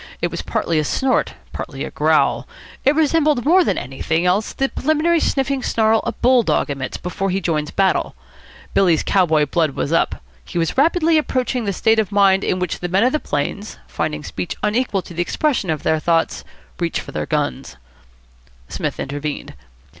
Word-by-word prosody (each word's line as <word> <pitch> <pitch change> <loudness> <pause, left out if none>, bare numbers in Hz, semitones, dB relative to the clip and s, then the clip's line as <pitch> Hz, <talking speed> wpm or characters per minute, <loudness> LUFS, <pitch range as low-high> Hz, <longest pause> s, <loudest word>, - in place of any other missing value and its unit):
It - - -1
was - - -4
partly 165 -2 -1
a - - +1
snort, 265 - 0 0.2
partly - - -5
a - - -6
growl. - - +2 0.4
It 280 +2 +3
resembled 305 -4 +2
more 360 +5 +5
than - - 0
anything 160 +6 -2
else 190 +5 +1
the 270 - 0
preliminary 315 +3 +1
sniffing 270 -2 0
snarl 220 -2 +2
a - - +1
bull 250 0 +3
dog 180 - 0
emits 130 -2 -4
before 195 +2 -3
he 190 +1 0
joins 155 -4 -1
battle. 195 -1 +1 0.6
Billy's 175 -5 +3
cow 185 -2 +2
boy 155 -2 +3
blood 155 -1 0
was 150 - -2
up. 165 - +2 0.3
He 65 - -7
was 165 -1 0
rapidly 320 +2 +3
approaching 255 -4 -1
the 200 - 0
state 220 +3 +2
of 215 -2 0
mind 195 -1 +4
in 185 - 0
which 180 -2 -3
the 180 - -4
men 190 +4 +3
of 250 - +3
the 305 - 0
plains, 200 - -3
finding 150 -1 -3
speech 175 - -5
unequal 210 -2 0
to - - -11
the 175 - -2
expression 255 - 0
of 155 -2 -2
their 160 - +2
thoughts, 165 +1 0 0.4
reach 170 -1 -1
for - - -9
their - - -3
guns. 145 - -2 0.9
Psmith - - -3
intervened. 145 +1 -4
195 Hz, 185 wpm, -20 LUFS, 160-260 Hz, 0.9 s, more